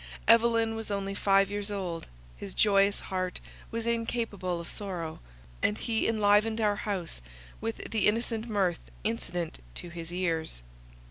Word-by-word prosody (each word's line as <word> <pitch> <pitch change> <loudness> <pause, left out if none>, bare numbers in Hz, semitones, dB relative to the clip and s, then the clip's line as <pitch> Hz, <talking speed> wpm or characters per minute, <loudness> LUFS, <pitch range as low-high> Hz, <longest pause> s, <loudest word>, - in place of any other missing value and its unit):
Evelyn 230 -1 +5
was 225 -1 -4
only 195 -1 -1
five 195 0 +4
years 205 0 -1
old; 185 -5 -3 0.3
his 95 +11 -8
joyous 200 -1 +5
heart 185 -1 -2 0.3
was 230 0 -3
incapable 230 -6 -1
of 170 - -7
sorrow, 175 -6 -4 0.4
and 210 - +2
he 225 -2 0
enlivened 215 0 +4
our 210 -2 +3
house 190 - -2 0.4
with 115 - -4
the 220 - +3
innocent 225 +1 0
mirth 190 -5 +1 0.2
incident 175 - -2 0.2
to 175 - -5
his 170 -1 -7
years. 165 - -1
200 Hz, 140 wpm, -30 LUFS, 180-225 Hz, 0.4 s, Evelyn